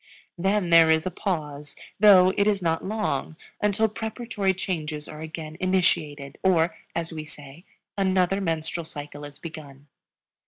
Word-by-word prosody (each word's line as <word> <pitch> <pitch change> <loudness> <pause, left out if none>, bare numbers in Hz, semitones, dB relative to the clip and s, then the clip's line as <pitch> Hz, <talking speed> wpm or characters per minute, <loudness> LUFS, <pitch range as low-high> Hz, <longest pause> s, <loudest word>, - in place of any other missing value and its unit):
Then 190 0 0
there 165 -1 +7
is 160 0 +3
a 185 - -1
pause, 150 -6 -4 0.2
though 190 -3 +7
it 205 - +2
is 205 -2 +2
not 165 -3 0
long, 190 -7 -2 0.2
until 210 +2 +2
preparatory 220 -2 -2
changes 155 -5 -4
are 155 0 -9
again 160 0 -7
initiated, 165 -6 0
or, 170 -3 +3 0.2
as 165 0 -3
we 155 -1 -5
say, 150 +2 -12 0.3
another 190 0 +2
Menstrual 165 -1 -2
Cycle 145 -1 -7
is 145 -1 -11
begun. 145 -4 -10
165 Hz, 145 wpm, -25 LUFS, 155-190 Hz, 0.3 s, there